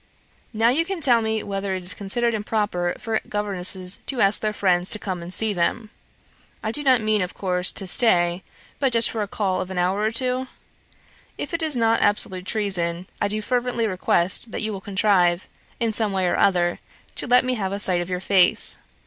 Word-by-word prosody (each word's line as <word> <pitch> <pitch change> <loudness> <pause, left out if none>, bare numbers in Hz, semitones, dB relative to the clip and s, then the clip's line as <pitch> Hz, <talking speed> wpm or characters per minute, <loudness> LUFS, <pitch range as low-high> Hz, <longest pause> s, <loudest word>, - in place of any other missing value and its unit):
"Now 225 0 +2
can 255 - +1
you 385 -2 -3
tell 245 -7 +4
me 220 -1 -1
whether 195 -1 -3
it 185 - -6
is 180 - -3
considered 235 +4 +1
improper 205 -5 -1
for 225 -2 -2
governesses 190 -2 +1
to 265 - -3
ask 195 -1 +2
their 215 - 0
friends 180 -3 +1
to - - +1
come 185 -4 -5
and 170 +1 -8
see 220 +2 0
them. 210 +5 -1 0.7
I 220 - -1
do 295 - -1
not 260 -4 +3
mean, 215 -1 +1
of 180 - -3
course, 180 -1 0
to 195 - -5
stay, 175 -3 +3 0.4
but 270 -3 +1
just 230 0 +5
for 225 - -3
a 205 - -2
call 190 -2 -1
of 185 - -6
an 190 - -6
hour 180 +3 +1
or 215 +1 +1
two? 255 +2 -1 0.9
If - - -6
it 335 - -1
is 310 -5 0
not 225 -1 +2
absolute 190 -3 0
treason, 180 -5 -1 0.2
I 205 - +2
do 215 +1 -2
fervently 245 -1 -1
request 185 +1 0
that - - -4
you 215 0 -1
will 195 - -6
contrive, 190 -3 +1 0.3
in 230 -2 0
some 215 -2 +1
way 190 -1 0
or 175 - +1
other, 175 -3 +2 0.4
to - - -2
let 250 +1 +4
me 255 - 0
have 195 -5 -3
a 200 - -3
sight 180 -3 +1
of 175 - -6
your 180 -1 -2
face. 190 -1 +4
205 Hz, 210 wpm, -23 LUFS, 185-225 Hz, 0.9 s, just